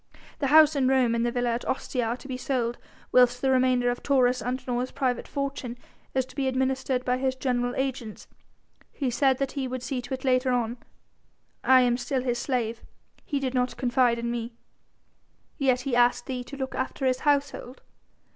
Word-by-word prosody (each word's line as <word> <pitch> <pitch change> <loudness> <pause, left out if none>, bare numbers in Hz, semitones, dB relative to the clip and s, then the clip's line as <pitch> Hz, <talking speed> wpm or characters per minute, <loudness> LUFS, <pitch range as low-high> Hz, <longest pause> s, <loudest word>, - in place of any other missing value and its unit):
The 280 - 0
house 310 +1 +6
in 270 -2 +2
Rome 260 -3 +3
and 235 0 0
the 240 - +1
villa 245 0 0
at 235 +1 -3
Ostia 255 -2 -1
are 230 +2 -2
to 270 - -12
be 260 - -4
sold, 250 -2 -2 0.3
whilst 250 0 +5
the 265 +1 +1
remainder 255 -1 +3
of 245 - -5
Taurus 255 -3 +2
Antinor's 250 0 -2
private 260 -3 -2
fortune 275 -4 -4 0.4
is 260 -1 +2
to - - -17
be 275 -2 0
administered 260 0 0
by 250 0 +1
his 260 0 0
general 245 -2 -1
agents. 260 -5 -4 0.6
He 265 -4 -2
said 265 +1 +2
that 275 0 -2
he 275 -2 -3
would 255 0 -5
see 255 -1 -3
to 245 +2 -7
it 260 - -12
later 255 0 +2
on. 240 -1 -1 0.9
I 260 0 +6
am 245 -1 +2
still 255 +1 -2
his 240 -2 -1
slave; 235 -4 -2 0.4
he 285 - -2
did 265 -2 -2
not 250 -1 0
confide 245 -2 +2
in 235 0 -2
me." 235 0 -4 1.1
"Yet 260 -3 +2
he 255 -1 -1
asked 245 0 +3
thee 255 -2 -4
to 280 - -9
look 265 -1 -4
after 260 +1 -3
his 255 0 +2
household." 280 -3 -1
255 Hz, 195 wpm, -26 LUFS, 245-265 Hz, 1.1 s, house